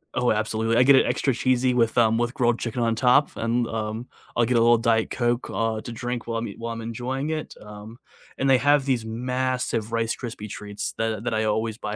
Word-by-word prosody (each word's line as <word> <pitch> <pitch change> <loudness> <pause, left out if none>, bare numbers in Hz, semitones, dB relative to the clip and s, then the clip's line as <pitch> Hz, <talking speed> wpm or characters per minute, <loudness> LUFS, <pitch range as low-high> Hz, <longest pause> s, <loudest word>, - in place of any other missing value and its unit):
Oh, 125 - +2
absolutely, 110 +1 0
I - - +6
get 140 +1 +7
it - - +5
extra 135 - 0
cheesy 130 0 +1
with, 115 -2 +2
um, 115 -1 +4
with 120 +1 -1
grilled 120 -2 +1
chicken 120 +1 -3
on 115 -1 +1
top, 125 +4 +4
and, 115 +1 0
um, 110 +2 -4 0.3
I'll 120 - +3
get 120 0 +1
a - - +5
little 120 0 +5
Diet 115 -1 +1
Coke, 120 0 -1
uh, 110 -1 -1
to 120 - -8
drink 120 0 -4
while 115 -1 -2
I'm 115 - -4
ea 100 - -8
while 115 0 -4
I'm 115 - -6
enjoying 125 +6 -4
it, 155 -1 -4
um, 105 +2 -11 0.4
and 135 0 0
they 130 - +6
have 145 0 +3
these 125 -5 0
massive 125 -1 -2
Rice 115 0 0
Krispie 115 -4 -7
treats 105 0 -5
that 110 -1 -2
that 120 - -1
I 110 - +1
always 110 +1 -1
buy 105 -2 -5
115 Hz, 230 wpm, -24 LUFS, 110-125 Hz, 0.4 s, get